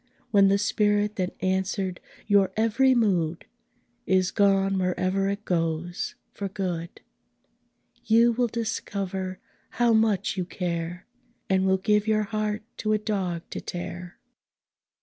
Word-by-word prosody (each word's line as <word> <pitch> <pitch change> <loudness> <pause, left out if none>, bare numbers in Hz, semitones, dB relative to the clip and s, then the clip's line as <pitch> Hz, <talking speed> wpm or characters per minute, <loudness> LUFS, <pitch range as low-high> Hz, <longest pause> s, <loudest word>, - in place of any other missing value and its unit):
When 200 -2 +6
the 195 +1 +4
spirit 210 0 +1
that 185 -1 -2
answered 190 0 -1 0.3
your 200 -2 +3
every 255 +4 +3
mood 175 -8 +1 0.6
Is 185 0 +2
gone 195 -2 +3
wherever 185 +1 0
it 200 +1 -4
goes 165 0 -2 0.2
for 200 -1 -4
good, 180 -3 -4 1.0
You 230 +2 +5
will 240 +1 +1
discover 195 -4 -3 0.4
how 240 -1 +4
much 215 -3 +2
you 185 - 0
care, 175 -1 -4 0.5
And 190 0 +3
will 190 0 +3
give 210 +2 +1
your 215 -1 +2
heart 215 0 -2
to 215 0 0
a - - +3
dog 190 -6 -2
to - - -4
tear! 175 0 -6
195 Hz, 130 wpm, -26 LUFS, 185-215 Hz, 1.0 s, When